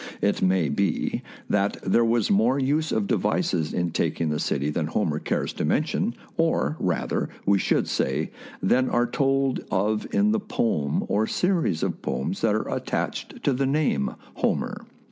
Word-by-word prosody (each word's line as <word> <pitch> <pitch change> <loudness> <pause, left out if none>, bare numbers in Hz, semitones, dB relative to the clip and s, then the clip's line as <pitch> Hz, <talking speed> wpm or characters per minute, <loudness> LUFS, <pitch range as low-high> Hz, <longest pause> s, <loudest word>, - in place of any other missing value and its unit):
It 100 - +1
may 95 -3 +3
be 95 +8 0 0.3
that 100 0 +1
there 105 +5 +3
was 115 -2 +2
more 115 +7 +3
use 145 +4 +1
of 110 -2 +1
devices 80 -4 0
in 85 -1 -1
taking 80 0 0
the 75 0 -1
city 70 +2 0
than 75 0 -1
Homer 80 -3 0
cares - - -2
to - - -3
mention, 155 - 0 0.2
or, 165 -2 +1
rather, 90 -2 -1 0.2
we 100 0 +4
should - - +1
say, - - -1 0.3
than 130 +7 +3
are 120 0 +2
told 135 +1 +1
of 105 +3 0
in 210 +1 +3
the 220 - +2
poem 80 - 0
or 110 +2 +1
series 175 - +1
of - - -2
poems 65 - -2
that - - +3
are - - -1
attached - - -3
to 140 - +3
the 135 +1 0
name 135 - +1 0.2
Homer. - - -1
105 Hz, 165 wpm, -25 LUFS, 85-135 Hz, 0.3 s, we